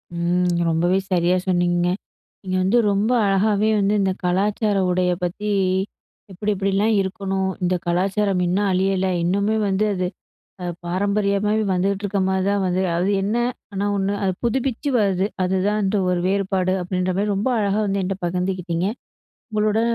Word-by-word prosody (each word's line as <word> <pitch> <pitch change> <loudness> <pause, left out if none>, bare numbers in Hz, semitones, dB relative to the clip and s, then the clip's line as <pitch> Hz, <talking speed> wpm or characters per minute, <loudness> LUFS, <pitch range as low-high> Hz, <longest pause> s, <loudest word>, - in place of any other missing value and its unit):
ம். 175 +1 +1 0.2
ரொம்பவே 175 +3 +2
சரியா 180 +1 +3
சொன்னீங்கங்க. 175 -1 +2 0.5
நீங்க 185 -1 -2
வந்து 195 +6 +3
ரொம்ப 205 +4 +1 0.2
அழகாவே 205 +2 +2
வந்து 200 +1 +2
இந்த 190 -1 +1
கலாச்சார 205 +3 +1
உடைய 180 0 +1
பத்தி 205 +4 -3 0.8
எப்படி 205 +3 -2
எப்படிலாம் 195 +3 +1
இருக்கணும்? 190 0 -2
இந்த 180 +1 +1
கலாச்சாரம் 190 +2 +1
இன்னும் 195 +3 +1
அழியல. 190 0 +1 0.2
இன்னுமே 200 +4 +1
வந்து 195 +2 +1
அது 180 -1 -1 0.6
அ - - -4 0.2
பாரம்பரியமாவே 200 +3 +1
வந்துகிட்டு 195 +2 0
இருக்க 205 0 -1
மாரி 190 0 +1
தான் 200 -1 +1
வந்து 185 +1 0
அது 185 +4 +1
என்ன? 210 +4 0 0.4
ஆனா 200 +1 -2
ஒண்ணு, 195 +1 0
"அது 190 - +1
புதுப்பிச்சு 265 +3 -1
வருது. 195 -2 +1 0.2
அதுதான் 190 +3 +1
அந்த 195 +2 +1
ஒரு 180 -1 +1
வேறுபாடு" 190 -1 0
அப்படின்ற 185 0 -1
மாரி 205 0 +1
ரொம்ப 205 +6 0
அழகா 205 0 +1
வந்து 195 0 0
என்ட்ட 190 +1 -2
பகிர்ந்துக்கிட்டிங்க. 180 0 -1 0.6
உங்களுட, 215 +1 +1
195 Hz, 145 wpm, -22 LUFS, 180-205 Hz, 0.8 s, சரியா